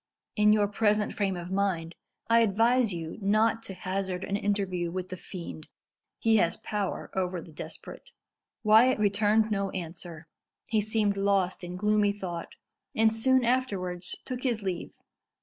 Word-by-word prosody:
In 210 Hz, -1 st, +5 dB
your 210 Hz, -1 st, +4 dB
present 210 Hz, 0 st, +1 dB
frame 195 Hz, -3 st, -1 dB
of 175 Hz, +1 st, -7 dB
mind 190 Hz, -4 st, 0 dB, 0.3 s
I 230 Hz, 0 st, +5 dB
advise 230 Hz, +2 st, +3 dB
you 165 Hz, 0 st, -5 dB
not 215 Hz, +3 st, +2 dB
to 195 Hz, -, -7 dB
hazard 185 Hz, 0 st, -3 dB
an 200 Hz, -, -2 dB
interview 195 Hz, -4 st, -1 dB
with 185 Hz, +1 st, -4 dB
the 185 Hz, -, -4 dB
fiend. 170 Hz, -4 st, -8 dB, 0.5 s
He 225 Hz, -1 st, +3 dB
has 170 Hz, -4 st, +2 dB
power 205 Hz, -3 st, -3 dB
over 185 Hz, -1 st, -1 dB
the 165 Hz, -, -11 dB
desperate." 150 Hz, -, -9 dB, 0.5 s
Wyat 225 Hz, +4 st, +6 dB
returned 210 Hz, +1 st, +2 dB
no 200 Hz, -1 st, 0 dB
answer. 170 Hz, -2 st, -7 dB, 0.4 s
He 220 Hz, -2 st, +1 dB
seemed 210 Hz, -1 st, 0 dB
lost 195 Hz, -2 st, +1 dB
in 175 Hz, 0 st, -6 dB
gloomy 210 Hz, +1 st, +2 dB
thought, 180 Hz, -4 st, -6 dB, 0.4 s
and 220 Hz, 0 st, +4 dB
soon 260 Hz, +2 st, +3 dB
afterwards 195 Hz, -8 st, -1 dB
took 255 Hz, -1 st, -4 dB
his 235 Hz, -5 st, -1 dB
leave. 185 Hz, -3 st, -4 dB
200 Hz, 150 wpm, -28 LUFS, 180-215 Hz, 0.5 s, Wyat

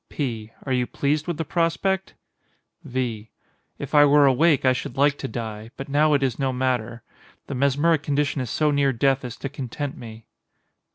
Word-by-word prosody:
P. 115 Hz, -6 st, -4 dB
Are 135 Hz, -, -1 dB
you 125 Hz, -1 st, +1 dB
pleased 150 Hz, +3 st, -1 dB
with 170 Hz, -3 st, -2 dB
the 165 Hz, -, -3 dB
prospect? 180 Hz, +4 st, -1 dB, 0.7 s
V. 120 Hz, -4 st, -3 dB, 0.5 s
If -, -, -7 dB
I 145 Hz, -1 st, +7 dB
were 145 Hz, 0 st, +6 dB
awake 140 Hz, +2 st, +3 dB
I 130 Hz, -, +5 dB
should 125 Hz, 0 st, -6 dB
like 140 Hz, +1 st, +3 dB
to 135 Hz, -, -3 dB
die, 110 Hz, -2 st, -6 dB
but 135 Hz, -, -7 dB
now 150 Hz, +1 st, +3 dB
it 140 Hz, -, +1 dB
is 130 Hz, -2 st, -1 dB
no 135 Hz, -1 st, +1 dB
matter. 125 Hz, -3 st, -2 dB, 0.4 s
The -, -, -6 dB
mesmeric 140 Hz, +4 st, +2 dB
condition 145 Hz, -1 st, 0 dB
is 125 Hz, -, -4 dB
so 150 Hz, +4 st, +1 dB
near 140 Hz, -1 st, +2 dB
death 135 Hz, +2 st, +1 dB
as 125 Hz, -1 st, -7 dB
to -, -, -4 dB
content 135 Hz, 0 st, -5 dB
me. 110 Hz, -1 st, -11 dB
135 Hz, 185 wpm, -24 LUFS, 125-145 Hz, 0.7 s, I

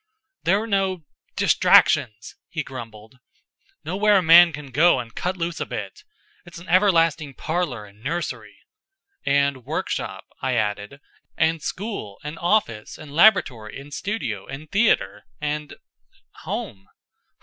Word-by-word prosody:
"There 195 Hz, +4 st, +3 dB
are 220 Hz, -, -4 dB
no 190 Hz, -5 st, -1 dB, 0.3 s
distractions," 110 Hz, +1 st, +3 dB
he 160 Hz, -2 st, -3 dB
grumbled. 115 Hz, -2 st, -10 dB, 0.7 s
"Nowhere 200 Hz, +4 st, +3 dB
a 185 Hz, -, +2 dB
man 170 Hz, +1 st, +8 dB
can 145 Hz, -2 st, -9 dB
go 160 Hz, +3 st, +4 dB
and 115 Hz, -2 st, -7 dB
cut 185 Hz, +1 st, -3 dB
loose 170 Hz, -1 st, -3 dB
a -, -, -2 dB
bit. 105 Hz, -6 st, -7 dB, 0.4 s
It's 175 Hz, -1 st, -12 dB
an 170 Hz, +2 st, -12 dB
everlasting 165 Hz, -7 st, +2 dB
parlor 160 Hz, -10 st, -3 dB
and 105 Hz, +2 st, -19 dB
nursery." 170 Hz, +1 st, -4 dB, 0.7 s
"And 140 Hz, -2 st, +1 dB
workshop," -, -, -4 dB, 0.2 s
I 130 Hz, -1 st, 0 dB
added. 105 Hz, +4 st, -2 dB, 0.4 s
"And 160 Hz, -1 st, +1 dB
school, 185 Hz, -, -5 dB
and 150 Hz, +2 st, -7 dB
office, 170 Hz, -, 0 dB
and 150 Hz, -2 st, -11 dB
laboratory, 130 Hz, -, +3 dB
and 145 Hz, +1 st, -12 dB
studio, 145 Hz, -, -4 dB
and 145 Hz, +3 st, -9 dB
theater, 195 Hz, -, +1 dB
and 150 Hz, 0 st, -4 dB, 0.7 s
home." 95 Hz, -1 st, -5 dB
150 Hz, 130 wpm, -23 LUFS, 120-175 Hz, 0.7 s, man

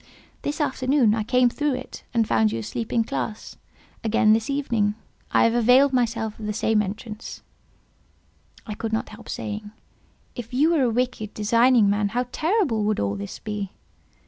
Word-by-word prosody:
This 295 Hz, +2 st, -3 dB
afternoon 260 Hz, -5 st, +2 dB
I 220 Hz, -, 0 dB
came 250 Hz, +3 st, +3 dB
through 290 Hz, +3 st, 0 dB
it, 255 Hz, -, -8 dB
and 230 Hz, -2 st, +1 dB
found 110 Hz, -2 st, +2 dB
you 115 Hz, -, -2 dB
asleep 115 Hz, -, -5 dB
in 230 Hz, -, +2 dB
classe; 220 Hz, -1 st, -5 dB, 0.5 s
again 220 Hz, -1 st, +4 dB
this 225 Hz, +4 st, 0 dB
evening 230 Hz, -7 st, 0 dB, 0.4 s
I -, -, +4 dB
have 230 Hz, -, +3 dB
availed 250 Hz, +4 st, +5 dB
myself 230 Hz, -3 st, -1 dB
of 215 Hz, -, -5 dB
the 210 Hz, -, -1 dB
same 220 Hz, 0 st, +2 dB
entrance." 215 Hz, +2 st, -7 dB, 1.2 s
I 215 Hz, -, -5 dB
could 220 Hz, +1 st, -4 dB
not 220 Hz, -, -1 dB
help 215 Hz, +2 st, -12 dB
saying, 210 Hz, 0 st, -5 dB, 0.6 s
"If 245 Hz, +1 st, -7 dB
you 305 Hz, +5 st, +4 dB
were 315 Hz, -, +2 dB
a 250 Hz, -, +3 dB
wicked, 235 Hz, -2 st, -2 dB
designing 230 Hz, +1 st, +4 dB
man, 205 Hz, 0 st, +1 dB
how 250 Hz, -, +1 dB
terrible 315 Hz, -, +1 dB
would 215 Hz, 0 st, 0 dB
all 100 Hz, 0 st, 0 dB
this 100 Hz, 0 st, -6 dB
be!" 210 Hz, -3 st, -5 dB
225 Hz, 170 wpm, -24 LUFS, 210-250 Hz, 1.2 s, availed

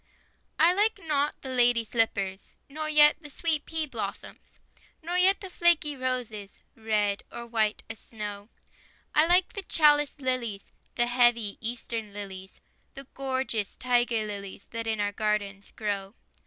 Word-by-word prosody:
I 340 Hz, +2 st, +5 dB
like 420 Hz, +3 st, +2 dB
not 300 Hz, -4 st, 0 dB
lady 245 Hz, -3 st, +3 dB
slippers, 200 Hz, -4 st, -1 dB
Nor 310 Hz, +2 st, -5 dB
yet 300 Hz, -1 st, +6 dB
the 295 Hz, -, -11 dB
sweet 310 Hz, 0 st, -1 dB
pea 320 Hz, -1 st, -1 dB
blossoms, 285 Hz, -, -8 dB, 0.4 s
Nor 345 Hz, +2 st, -3 dB
yet 380 Hz, +2 st, +5 dB
the 385 Hz, -, -7 dB
flaky 340 Hz, -4 st, +3 dB
roses, 250 Hz, -6 st, -4 dB
Red, 210 Hz, -2 st, 0 dB
or 235 Hz, -, -7 dB
white 220 Hz, -2 st, 0 dB
as 225 Hz, -, -8 dB
snow; 205 Hz, -1 st, -7 dB, 0.6 s
I 305 Hz, +2 st, +4 dB
like 360 Hz, +1 st, +4 dB
the 400 Hz, -, -3 dB
chaliced 295 Hz, -5 st, +3 dB
lilies, 245 Hz, -6 st, -2 dB, 0.2 s
The 240 Hz, -, +3 dB
heavy 240 Hz, -4 st, +2 dB
Eastern 230 Hz, -2 st, -3 dB
lilies, 190 Hz, -2 st, -8 dB, 0.4 s
The 275 Hz, -, -8 dB
gorgeous 260 Hz, -6 st, -2 dB
tiger 240 Hz, -3 st, +1 dB
lilies, 200 Hz, -2 st, -7 dB
That 230 Hz, -1 st, -4 dB
in 220 Hz, -1 st, -1 dB
our 205 Hz, 0 st, 0 dB
gardens 205 Hz, -2 st, -2 dB
grow. 200 Hz, -1 st, -3 dB
240 Hz, 140 wpm, -27 LUFS, 210-295 Hz, 0.6 s, yet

